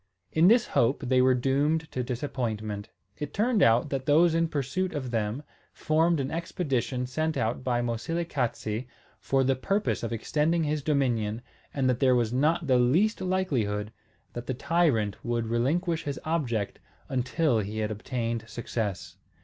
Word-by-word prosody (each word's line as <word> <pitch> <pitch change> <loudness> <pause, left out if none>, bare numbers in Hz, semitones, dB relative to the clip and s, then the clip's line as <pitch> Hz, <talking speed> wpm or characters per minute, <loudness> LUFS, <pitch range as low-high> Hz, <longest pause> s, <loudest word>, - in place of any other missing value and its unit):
In 160 +2 +4
this 235 +3 +5
hope 125 +5 +1
they 130 0 +4
were 130 0 +4
doomed 140 +5 +1
to 125 - -2
disappointment. 115 -5 -3 0.3
It 150 - -5
turned 220 0 +2
out 120 +3 +4
that 135 -2 -3
those 160 +3 +5
in 165 0 +2
pursuit 155 +6 -2
of 130 -4 -3
them 115 +4 -1 0.3
formed 160 +1 +2
an 135 -1 -2
expedition 135 -7 -2
sent 155 +5 -1
out 115 +3 -1
by 120 -1 0
Moselekatse 120 -3 -2 0.3
for 135 0 +1
the 135 +1 +2
purpose 195 +11 -1
of 115 - -3
extending 155 +8 0
his 150 0 -1
dominion 120 -7 0 0.3
and 135 -2 0
there 130 0 +3
was 120 -1 +1
not 155 +6 +2
the 130 -3 +3
least 170 - +2
likelihood 125 - -1 0.4
that 120 0 -6
the 130 - -2
tyrant 140 - +1
would 120 -1 -1
relinquish 160 +9 0
his 140 -2 -3
object 125 -11 -1 0.3
until 130 0 +1
he 105 +1 -4
had 110 0 -1
obtained 115 +1 -3
success. 105 -6 -4
130 Hz, 155 wpm, -27 LUFS, 115-160 Hz, 0.4 s, this